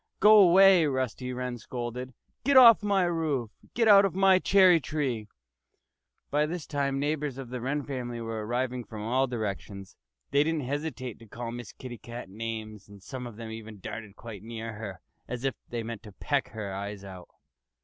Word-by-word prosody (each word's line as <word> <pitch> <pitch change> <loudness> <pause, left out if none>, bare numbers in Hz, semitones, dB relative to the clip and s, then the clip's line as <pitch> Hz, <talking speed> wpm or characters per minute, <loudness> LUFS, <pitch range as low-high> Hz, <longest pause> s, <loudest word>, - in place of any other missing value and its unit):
"Go 210 +1 +8
away!" 190 -2 +7
Rusty 130 -2 -2
Wren 125 -1 -4
scolded. 125 +2 -6 0.3
"Get 275 +1 +4
off 235 -4 +9
my 200 -2 +2
roof! 155 -9 -1 0.2
Get 230 -2 +3
out 200 -2 +8
of 195 -3 0
my 190 -1 +5
cherry 185 -3 +6
tree!" 135 -8 -2 1.0
By 150 +1 +2
this 170 -1 -5
time 140 -2 -1
feathered - - -1
neighbors 145 -2 -1
of 135 -3 -7
the 125 -1 -4
Wren 140 +4 -1
family 125 -4 -5
were 115 -1 -4
arriving 125 +2 -2
from 110 -2 -8
all 130 +4 +1
directions. 100 -4 -5 0.4
They 140 +1 +4
didn't 160 0 -1
hesitate 135 -4 -4
to 115 - -14
call 115 +2 -6
Miss 120 -3 -7
Kitty 120 -2 -9
Cat 120 -5 -9
names. 110 -1 -6
And 100 -1 -14
some 125 +1 -6
of 120 - -10
them 115 0 -7
even 110 -2 -9
darted 105 +1 -7
quite 110 -4 -9
near 115 0 -6
her, 105 -3 -7 0.3
as 125 +1 -5
if 135 - +1 0.2
they 120 -1 -3
meant 115 -2 -6
to 105 -2 -12
peck 140 +6 -1
her 105 -4 -6
eyes 100 +1 -5
out. 95 -2 -10
125 Hz, 190 wpm, -28 LUFS, 110-150 Hz, 1.0 s, off